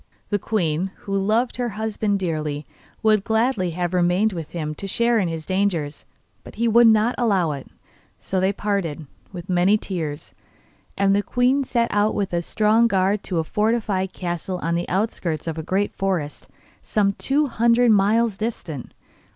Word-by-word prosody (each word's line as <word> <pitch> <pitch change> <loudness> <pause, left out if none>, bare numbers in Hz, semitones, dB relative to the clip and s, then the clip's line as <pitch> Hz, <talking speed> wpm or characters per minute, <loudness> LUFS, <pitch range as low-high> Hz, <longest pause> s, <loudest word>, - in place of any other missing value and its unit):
The 205 - +1
queen, 180 -4 -1
who 195 - -3
loved 215 +6 +1
her 245 -1 -1
husband 215 -2 -1
dearly, 155 -5 -3 0.4
would 215 -2 +4
gladly 220 -4 +1
have 175 0 -1
remained 180 +4 +2
with 165 -4 -6
him 155 -3 -4
to 195 +6 -6
share 235 +3 +2
his 165 -5 -2
dangers, 180 -6 -1 0.4
but - - -12
he 235 +2 0
would 235 +1 +6
not 220 +2 +4
allow 195 -9 +2
it. 140 -2 -6 0.5
So 190 - -2
they 190 +1 +2
parted, 195 -7 -2 0.3
with 180 -2 -8
many 185 +3 +3
tears, 160 -8 -5 0.6
and 195 0 +3
the 205 - +2
queen 250 +5 +1
set 235 -2 0
out 205 +1 +2
with 195 -3 -2
a 170 - +1
strong 215 +5 +3
guard 195 0 +1
to 180 - -2
a 165 - +1
fortified 210 -1 0
castle 175 +1 -4
on 165 - 0
the 170 +1 -2
outskirts 185 -5 -1
of 165 -1 -3
a - - -2
great 190 +5 -1
forest, 180 -7 -3 0.3
some 200 -2 +1
two 285 +8 +1
hundred 235 -1 +3
miles 215 +1 +3
distant. 180 - -5
195 Hz, 165 wpm, -22 LUFS, 175-220 Hz, 0.6 s, would